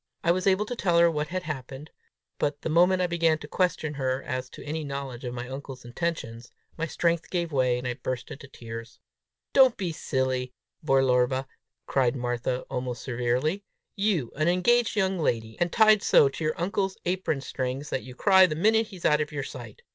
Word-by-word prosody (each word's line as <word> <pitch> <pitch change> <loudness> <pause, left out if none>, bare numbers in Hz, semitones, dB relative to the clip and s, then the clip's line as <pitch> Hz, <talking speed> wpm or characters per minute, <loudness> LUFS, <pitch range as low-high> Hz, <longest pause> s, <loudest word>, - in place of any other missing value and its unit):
I 170 - +4
was 185 +2 0
able 195 +2 +3
to 245 - -4
tell 175 -7 +1
her 170 0 +6
what 150 -1 -2
had 185 +2 -3
happened; 140 -1 -7 0.5
but 145 0 -1
the - - -2
moment 180 +3 +4
I - - +3
began 165 -2 +2
to 150 - -10
question 175 -2 0
her 130 -1 -2
as 130 -1 -4
to - - -11
any 155 +2 -3
knowledge 140 -3 -5
of 120 0 -4
my 120 0 -5
uncle's 135 -1 -8
intentions, 120 -4 -4 0.3
my 165 0 -2
strength 170 +1 0
gave 170 -2 -2
way, 130 -3 +2
and 125 0 -4
I 125 - -1
burst 125 0 -5
into 140 0 -9
tears. 115 -2 -9 0.5
"Don't 260 -3 +6
be 185 -4 -2
silly, 130 -4 -2 0.3
Belorba!" 130 -2 +2 0.4
cried 130 -1 +1
Martha, 120 0 -2
almost 125 -2 -5
severely. 130 +9 -1 0.3
"You 195 - 0
an 155 +2 0
engaged 225 +8 +3
young 190 -3 +1
lady, 110 -7 -1
and 175 0 +1
tied 215 -2 +5
so 140 - +5
to 150 - -6
your 155 +1 -1
uncle's 190 +2 -1
apron 180 -5 -1
strings 135 +2 -4
that 130 - -1
you 125 -1 -11
cry 190 +3 +6
the 155 - -3
minute 220 +6 +3
he's 185 -5 -10
out 150 0 +4
of 150 - -3
your 145 -2 -3
sight! 485 - -9
150 Hz, 195 wpm, -27 LUFS, 130-180 Hz, 0.5 s, her